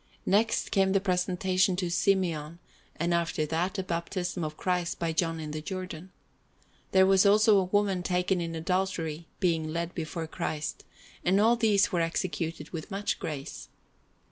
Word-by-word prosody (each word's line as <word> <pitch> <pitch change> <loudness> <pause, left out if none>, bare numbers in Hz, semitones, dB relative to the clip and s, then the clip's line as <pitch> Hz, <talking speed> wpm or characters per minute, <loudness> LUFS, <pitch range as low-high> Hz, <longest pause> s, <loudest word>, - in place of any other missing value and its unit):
Next 220 +4 +2
came 190 -1 +3
the 195 - +4
Presentation 185 0 +1
to 180 -2 -2
Simeon, 170 -5 +1 0.4
and 170 +2 0
after 170 -2 0
that 170 +5 -1
the 190 - -2
Baptism 175 0 -3
of 155 0 -4
Christ 180 -2 -1
by 165 -1 -1
John 165 0 0
in 155 -1 -5
the 155 0 -4
Jordan. 185 0 -6 0.8
There 190 0 +6
was 195 0 +5
also 210 +1 +5
the 190 - +3
Woman 195 -1 +1
taken 180 0 0
in 165 -1 -4
Adultery 165 -2 -2
being 165 -4 +1
led 170 +1 -3
before 165 0 -4
Christ, 155 -1 -4 0.4
and 190 +3 +3
all 225 +3 +5
these 215 -4 +3
were 175 - +1
executed 165 -2 -2
with 160 -3 -6
much 200 +1 -2
grace. 140 - -6
180 Hz, 160 wpm, -28 LUFS, 165-190 Hz, 0.8 s, There